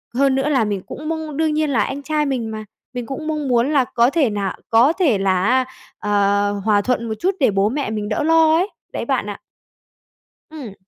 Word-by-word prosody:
Hơn 275 Hz, 0 st, +3 dB
nữa 270 Hz, +2 st, 0 dB
là 265 Hz, -6 st, +2 dB
mình 200 Hz, -3 st, -2 dB
cũng 305 Hz, +2 st, -6 dB
mong 315 Hz, -3 st, -4 dB
đương 315 Hz, -1 st, +1 dB
nhiên, 310 Hz, 0 st, 0 dB
là 250 Hz, -6 st, +2 dB
anh 280 Hz, +1 st, -5 dB
trai 300 Hz, 0 st, 0 dB
mình 250 Hz, -5 st, -2 dB
mà, 215 Hz, 0 st, -6 dB, 0.3 s
mình 245 Hz, -1 st, -4 dB
cũng 310 Hz, +5 st, -6 dB
mong 300 Hz, -2 st, -2 dB
muốn 245 Hz, +3 st, +2 dB
là 275 Hz, -4 st, +3 dB
có 235 Hz, +2 st, +4 dB
thể 285 Hz, -5 st, +2 dB
nà 200 Hz, -2 st, -3 dB
có 240 Hz, +8 st, +5 dB
thể 315 Hz, -, +2 dB
là 190 Hz, -1 st, +1 dB
á, 255 Hz, +4 st, +2 dB, 0.3 s
ờ, 205 Hz, 0 st, +1 dB
hòa 205 Hz, -2 st, +3 dB
thuận 235 Hz, 0 st, -1 dB
một -, -, -1 dB
chút 380 Hz, +2 st, 0 dB
để 260 Hz, -7 st, +3 dB
bố 195 Hz, +1 st, +2 dB
mẹ 280 Hz, +2 st, -2 dB
mình 210 Hz, -1 st, -3 dB
đỡ 220 Hz, -, -1 dB
lo 320 Hz, 0 st, +4 dB
ấy, 370 Hz, +4 st, 0 dB, 0.2 s
đấy -, -, -3 dB
bạn -, -, 0 dB
ạ. -, -, -7 dB, 1.1 s
Ừm. 280 Hz, -10 st, -8 dB
260 Hz, 225 wpm, -20 LUFS, 215-300 Hz, 1.1 s, có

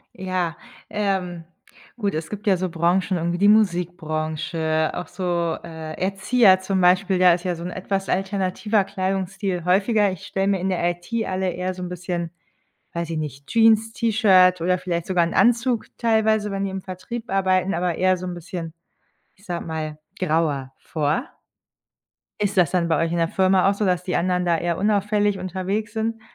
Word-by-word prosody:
Ja, 185 Hz, -3 st, -2 dB, 0.3 s
ähm, 185 Hz, -5 st, -2 dB, 0.5 s
gut, 205 Hz, -6 st, -1 dB
es 160 Hz, 0 st, -4 dB
gibt 210 Hz, 0 st, -7 dB
ja 190 Hz, -2 st, +4 dB
so 185 Hz, +1 st, -2 dB
Branchen, 175 Hz, +2 st, +1 dB
irgendwie 170 Hz, +1 st, -1 dB
die 205 Hz, +1 st, +4 dB
Musikbranche, 160 Hz, -5 st, +1 dB
auch 180 Hz, -, -4 dB
so, 175 Hz, -3 st, -1 dB
äh, 160 Hz, -2 st, -7 dB
Erzieher 195 Hz, +1 st, +4 dB
zum 190 Hz, 0 st, -1 dB
Beispiel, 185 Hz, +1 st, +3 dB
da 180 Hz, -2 st, +6 dB
ist 175 Hz, +1 st, -6 dB
ja 180 Hz, -1 st, 0 dB
so 170 Hz, -, -8 dB
'n 180 Hz, -, -4 dB
etwas 195 Hz, +1 st, -3 dB
alternativer 195 Hz, +2 st, 0 dB
Kleidungsstil 190 Hz, -1 st, -2 dB
häufiger. 200 Hz, +3 st, +3 dB
Ich 185 Hz, -, -8 dB
stelle 195 Hz, 0 st, -1 dB
mir 195 Hz, -3 st, +1 dB
in 190 Hz, -, -1 dB
der 175 Hz, -1 st, +1 dB
IT 175 Hz, +6 st, -9 dB
alle 185 Hz, 0 st, -1 dB
eher 180 Hz, +1 st, -3 dB
so'n 180 Hz, -1 st, -6 dB
bisschen, 175 Hz, -1 st, -4 dB, 0.6 s
weiß 170 Hz, -1 st, -3 dB
ich 165 Hz, -, -3 dB
nicht, 140 Hz, -2 st, -6 dB
Jeans, 225 Hz, -1 st, +4 dB
T-Shirt 190 Hz, -6 st, +4 dB
oder 180 Hz, +1 st, +2 dB
vielleicht 170 Hz, -2 st, -3 dB
sogar 180 Hz, -2 st, +2 dB
'n 170 Hz, -, -4 dB
Anzug 240 Hz, -1 st, +3 dB
teilweise, 220 Hz, -2 st, +2 dB
wenn 195 Hz, 0 st, -2 dB
die 195 Hz, -, -2 dB
im 190 Hz, 0 st, -5 dB
Vertrieb 195 Hz, +6 st, -7 dB
arbeiten, 190 Hz, 0 st, +2 dB
aber 175 Hz, -1 st, 0 dB
eher 185 Hz, 0 st, +2 dB
so'n 180 Hz, 0 st, -5 dB
bisschen, 170 Hz, -1 st, -6 dB, 0.6 s
ich 195 Hz, -, -24 dB
sage 175 Hz, -1 st, -4 dB
mal, 155 Hz, -2 st, -4 dB, 0.2 s
grauer 150 Hz, -6 st, 0 dB
vor. 155 Hz, -, -1 dB, 1.2 s
Ist 205 Hz, -1 st, 0 dB
das 175 Hz, -5 st, +4 dB
dann 175 Hz, -2 st, +1 dB
bei 165 Hz, 0 st, +2 dB
euch 165 Hz, -, -2 dB
in 170 Hz, -, -1 dB
der 165 Hz, -, +2 dB
Firma 190 Hz, +1 st, +3 dB
auch 200 Hz, -, +2 dB
so, 210 Hz, -, -1 dB
dass 180 Hz, -1 st, +1 dB
die 180 Hz, -, -2 dB
anderen 180 Hz, 0 st, +1 dB
da 170 Hz, -1 st, +2 dB
eher 170 Hz, 0 st, -2 dB
unauffällig 205 Hz, 0 st, +1 dB
unterwegs 190 Hz, +4 st, -3 dB
sind? 225 Hz, 0 st, -2 dB
185 Hz, 180 wpm, -23 LUFS, 170-195 Hz, 1.2 s, da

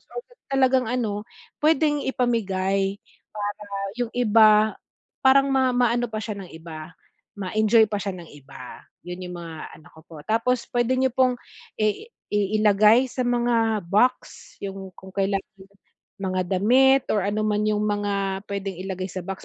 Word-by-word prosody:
o -, -, -22 dB, 0.4 s
talagang 260 Hz, -2 st, +3 dB
ano, 215 Hz, -4 st, -2 dB, 0.4 s
puwedeng 300 Hz, -1 st, +2 dB
ipamigay 195 Hz, -6 st, 0 dB, 0.4 s
para 205 Hz, 0 st, -5 dB, 0.3 s
yung 240 Hz, -2 st, -2 dB
iba, 215 Hz, -2 st, +5 dB, 0.5 s
parang 275 Hz, +1 st, +5 dB
ma 260 Hz, -1 st, +2 dB
maano 240 Hz, 0 st, +2 dB
pa 215 Hz, -, -3 dB
siya 210 Hz, -1 st, -5 dB
ng 185 Hz, -, -10 dB
iba 160 Hz, 0 st, -9 dB, 0.5 s
ma-enjoy 215 Hz, +3 st, +3 dB
pa 205 Hz, -, -1 dB
siya 195 Hz, -1 st, -4 dB
ng 170 Hz, -2 st, -11 dB
iba, 135 Hz, -3 st, -12 dB, 0.2 s
'yon 180 Hz, +1 st, -7 dB
yung 180 Hz, -, -7 dB
mga 165 Hz, -2 st, -8 dB
ano 155 Hz, -, -18 dB
ko 160 Hz, -, -16 dB
po. 165 Hz, -, -13 dB
Tapos 235 Hz, +5 st, 0 dB
puwede 245 Hz, +1 st, +1 dB
nyo 260 Hz, 0 st, +2 dB
pong 255 Hz, -1 st, +3 dB, 0.5 s
i 215 Hz, -, 0 dB, 0.2 s
i 210 Hz, +1 st, 0 dB
ilagay 215 Hz, +5 st, +5 dB
sa 255 Hz, -, -2 dB
mga 235 Hz, -3 st, +1 dB
box 250 Hz, +6 st, 0 dB
yung 195 Hz, -1 st, -6 dB
kung 190 Hz, -, -12 dB
kailangan, 195 Hz, 0 st, 0 dB, 0.8 s
mga 185 Hz, -1 st, -1 dB, 0.2 s
damit 265 Hz, +6 st, +4 dB
or 205 Hz, -3 st, +1 dB
ano 210 Hz, +1 st, -1 dB
man 210 Hz, 0 st, 0 dB
yung 210 Hz, 0 st, 0 dB
mga 200 Hz, -1 st, -1 dB
puwedeng 195 Hz, -2 st, -4 dB
ilagay 185 Hz, -1 st, -4 dB
sa 185 Hz, -, -5 dB
box 195 Hz, -1 st, -6 dB
210 Hz, 155 wpm, -24 LUFS, 195-245 Hz, 0.8 s, iba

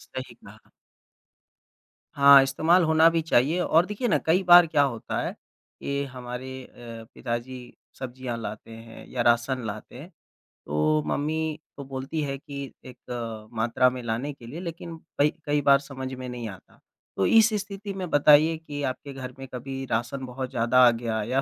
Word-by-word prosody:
सही 130 Hz, -2 st, -6 dB
कहा। 110 Hz, -2 st, -17 dB, 1.5 s
हाँ, 140 Hz, 0 st, +8 dB
इस्तेमाल 160 Hz, +7 st, +3 dB
होना 160 Hz, 0 st, +5 dB
भी 165 Hz, 0 st, 0 dB
चाहिए 155 Hz, +1 st, +2 dB
और 170 Hz, 0 st, +3 dB
देखिए 210 Hz, +5 st, -3 dB
ना 165 Hz, -, +3 dB
कई 170 Hz, +4 st, +3 dB
बार 175 Hz, -1 st, +8 dB
क्या 150 Hz, -2 st, +2 dB
होता 120 Hz, -5 st, -3 dB
है -, -, -3 dB
कि 140 Hz, 0 st, -7 dB
हमारे 130 Hz, +1 st, -7 dB
अ, 115 Hz, -2 st, -11 dB
पिताजी 120 Hz, +1 st, -5 dB, 0.3 s
सब्जियाँ 125 Hz, -2 st, -5 dB
लाते 110 Hz, 0 st, -7 dB
हैं 115 Hz, 0 st, -12 dB
या 125 Hz, -, -2 dB
राशन 120 Hz, +2 st, +2 dB
लाते 110 Hz, +1 st, -7 dB
है, 155 Hz, -, -10 dB, 0.6 s
तो 150 Hz, -, +1 dB
मम्मी 155 Hz, +1 st, -2 dB, 0.2 s
तो 140 Hz, -, -6 dB
बोलती 135 Hz, +4 st, -4 dB
है 140 Hz, -2 st, -3 dB
कि 140 Hz, -1 st, -8 dB
एक 115 Hz, -3 st, -7 dB
मात्रा 120 Hz, +3 st, +2 dB
में 125 Hz, 0 st, -6 dB
लाने 120 Hz, +6 st, -3 dB
के 120 Hz, -, -15 dB
लिए 145 Hz, +8 st, -7 dB
लेकिन 170 Hz, -1 st, -7 dB, 0.2 s
कई 145 Hz, +1 st, +5 dB, 0.2 s
कई 145 Hz, 0 st, +1 dB
बार 140 Hz, 0 st, +5 dB
समझ 130 Hz, -2 st, -7 dB
में 130 Hz, 0 st, -7 dB
नहीं 120 Hz, -2 st, -5 dB
आता। 95 Hz, -, -14 dB, 0.4 s
तो 95 Hz, -, +2 dB
इस 225 Hz, 0 st, +6 dB
स्थिति 200 Hz, 0 st, -7 dB
में 185 Hz, -2 st, -5 dB
बताइए 150 Hz, +2 st, +5 dB
कि 150 Hz, -3 st, -7 dB
आपके 140 Hz, +1 st, -4 dB
घर 130 Hz, -1 st, -7 dB
में 135 Hz, -, -8 dB
कभी 135 Hz, +2 st, -5 dB
राशन 120 Hz, +4 st, -2 dB
बहुत 130 Hz, 0 st, -5 dB
ज़्यादा 120 Hz, +2 st, +2 dB
आ -, -, +6 dB
गया 115 Hz, -1 st, -3 dB
या 130 Hz, +5 st, 0 dB
130 Hz, 175 wpm, -26 LUFS, 120-155 Hz, 1.5 s, हाँ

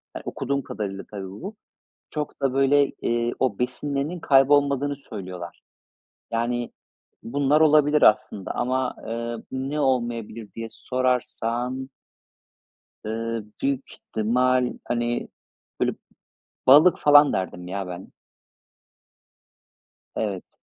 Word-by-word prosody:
eee, -, -, -5 dB
okuduğum 140 Hz, 0 st, -2 dB
kadarıyla 100 Hz, -4 st, -5 dB
tabii 100 Hz, -2 st, -6 dB
bu, 190 Hz, -, -8 dB, 0.5 s
çok 150 Hz, -2 st, -5 dB
da, 135 Hz, -2 st, +1 dB
böyle, 135 Hz, +1 st, +4 dB, 0.2 s
eee, 120 Hz, 0 st, 0 dB
o 125 Hz, -6 st, 0 dB
besinlerinin 140 Hz, +6 st, -2 dB
kaybolmadığını 140 Hz, 0 st, +3 dB
söylüyorlar. 95 Hz, -9 st, -8 dB, 0.7 s
Yani, 120 Hz, +1 st, -1 dB, 0.5 s
bunlar 145 Hz, +4 st, +2 dB
olabilir 150 Hz, -1 st, +5 dB
aslında 105 Hz, -2 st, +3 dB
ama, 130 Hz, +1 st, 0 dB
eee, 115 Hz, +1 st, -3 dB, 0.2 s
ne 135 Hz, +3 st, -2 dB
olmayabilir 120 Hz, -5 st, -1 dB
diye 115 Hz, 0 st, -5 dB
sorarsan 125 Hz, 0 st, -1 dB, 1.2 s
eee, 115 Hz, +1 st, -3 dB, 0.2 s
büyük 135 Hz, -1 st, -1 dB
ihtimal, 125 Hz, +3 st, +1 dB
hani, 120 Hz, 0 st, -1 dB, 0.5 s
böyle, -, -, +2 dB, 0.8 s
balık 150 Hz, +7 st, +8 dB
falan 145 Hz, 0 st, +7 dB
derdim 90 Hz, -1 st, -3 dB
ya 95 Hz, +1 st, -4 dB
ben. 90 Hz, +1 st, -8 dB, 2.1 s
Evet. 100 Hz, -4 st, -4 dB
125 Hz, 100 wpm, -24 LUFS, 115-140 Hz, 2.1 s, balık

